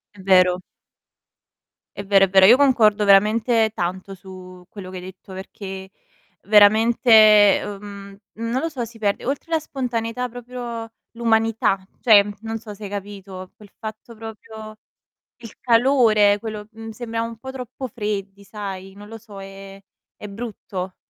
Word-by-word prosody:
È 195 - -13
vero. 185 -1 +3 1.3
È 200 - -6
vero, 195 -1 +4
è - - -7
vero. 190 0 +6
Io 240 +4 +7
concordo 220 -7 +3
veramente 220 +3 +3
tanto 185 0 -5
su 185 -1 -13
quello 190 -3 -10
che 185 - -8
hai 180 - -9
detto, 190 +1 -13
perché 190 0 -9 0.5
veramente, 220 +4 +4 0.5
ehm, 200 -1 -9 0.2
non 230 +3 -2
lo 330 - -1
so, 265 -6 -5
si 230 0 -10
perde 205 -2 -2
oltre 280 +5 -4
la 325 - +2
spontaneità 250 -4 -4
proprio 240 -1 -8 0.2
l'umanità. 225 -3 +1 0.2
Cioè, 215 -5 +6 0.2
non 225 0 -5
so 220 -1 -10
se 205 +1 -10
hai - - -7
capito, 195 -2 -8
quel 210 -1 -17
fatto 220 +1 -9
proprio 220 0 -10 0.6
il 230 -3 -13
calore 230 -5 +3
quello 215 -1 -7
mhmm, 225 0 -9
sembriamo 230 0 -4
un 230 -1 -10
po' 265 +3 -8
troppo 260 0 -7
freddi, 200 -3 -5
sai, 195 -2 -8
non 205 +1 -13
lo 225 +1 -9
so, 210 -3 -12
è 195 0 -11 0.4
è 210 - -9
brutto 200 -4 -7
215 Hz, 150 wpm, -21 LUFS, 195-230 Hz, 1.3 s, Io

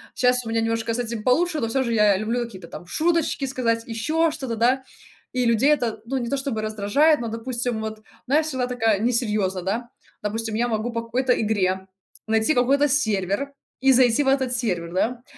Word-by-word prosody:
щас 250 -1 +2
у - - -5
меня 225 0 +1
немножко 225 0 -1
с 235 - -3
этим 230 -2 -3
получше, 315 +5 +2
но 230 - 0
всё 265 +4 0
же 235 - -2
я 210 -2 +4
люблю 225 +4 -1
какие-то 190 -7 -11
там 175 - -10
шуточки 330 - 0
сказать, 235 -4 -1
ещё 310 +9 +1
что-то, 265 -7 -4
да, 255 +4 +2 0.5
и 250 -1 +1
людей 235 +6 +4
это, 240 -7 0
ну, 270 +3 -2
не 240 -2 -3
то 280 - 0
чтобы 265 -5 -3
раздражает, 215 +9 +2
но, 235 - -3
допустим, 235 0 -3
вот, 220 0 -6 0.2
знаешь, 300 +4 +3
всегда 260 -4 -1
такая 225 -5 +1
несерьёзная, 210 -5 0
да. 230 +6 -2 0.3
Допустим, 220 +1 -3
я 240 +2 +1
могу 225 +1 -2
по 230 - -1
какой-то 250 +2 +1
игре 190 -3 0 0.4
найти 220 +6 +2
какой-то 275 +4 +3
сервер 220 -1 0 0.3
и 270 0 +5
зайти 250 +1 +4
в 270 - -3
этот 270 -2 +2
сервер, 180 -9 -2
да, 235 +6 -1
235 Hz, 195 wpm, -23 LUFS, 220-260 Hz, 0.5 s, и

